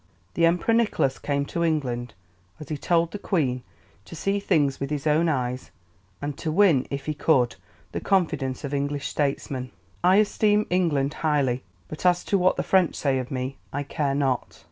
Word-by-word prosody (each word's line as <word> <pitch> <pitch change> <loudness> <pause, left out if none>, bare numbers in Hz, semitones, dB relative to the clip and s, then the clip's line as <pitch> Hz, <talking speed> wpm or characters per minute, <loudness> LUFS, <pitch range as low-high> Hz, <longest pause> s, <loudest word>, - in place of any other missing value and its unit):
The 165 -1 +4
Emperor 180 +7 +2
Nicholas 215 - +1
came 140 -1 -1
to 170 +4 -2
England, 125 -7 -1 0.4
as 150 - -10
he 155 - -2
told 170 0 +1
the 205 - -6
Queen, 135 -12 0 0.4
to - - -10
see 195 +5 0
things 145 -8 +1
with 140 - -3
his 150 -1 -3
own 160 +2 +3
eyes, 125 -3 -2 0.5
and 145 -1 -3
to 160 - -2
win, 165 -7 +4
if 140 0 -4
he 155 - -1
could, 135 -5 +2 0.4
the - - -3
confidence 155 -9 0
of 140 0 -4
English 140 0 -1
statesmen. 135 -3 -2 0.3
"I 185 - +6
esteem 210 0 +3
England 150 -6 +1
highly; 140 -5 +1 0.3
but 155 - -8
as 180 -1 +3
to 200 - +1
what 180 +1 +3
the - - 0
French 185 -3 +3
say 135 -2 0
of 125 - -5
me, 130 +1 -4
I 145 +1 -2
care 140 -1 -1
not." 135 -3 -1
150 Hz, 185 wpm, -25 LUFS, 135-170 Hz, 0.5 s, I